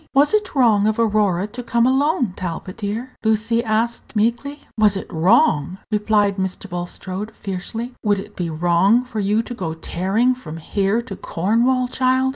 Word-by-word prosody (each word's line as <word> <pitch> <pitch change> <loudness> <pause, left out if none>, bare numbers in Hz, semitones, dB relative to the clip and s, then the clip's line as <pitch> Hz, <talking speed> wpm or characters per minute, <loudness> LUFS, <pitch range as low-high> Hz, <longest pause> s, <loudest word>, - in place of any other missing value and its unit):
"Was 285 +5 +5
it 425 -6 0
wrong 220 -6 +4
of 215 - +1
Aurora 205 -5 +2
to 225 +4 -7
come 235 -1 +1
alone, 265 - +2
Talbot, 185 +1 -5
dear?" 225 +4 -4
Lucy 225 +1 +1
asked, 230 +2 -1
meekly. 240 +7 0
"Was 210 -3 +3
it - - -5
wrong?" 180 - +3
repeated 210 -1 +2
Mr. 190 +1 -3
Bulstrode, 185 +3 -5
fiercely. 215 +6 -5
"Would 205 -2 +2
it 195 - -8
be 175 -2 -3
wrong 175 +9 +3
for 230 -3 -5
you 210 +3 +1
to 245 - -7
go 165 -8 -4
tearing 195 +9 0
from 165 -11 -9
here 200 +7 0
to 200 -5 -7
Cornwall, 235 +10 +1
child?" 260 +1 +1
215 Hz, 165 wpm, -21 LUFS, 190-240 Hz, -, Was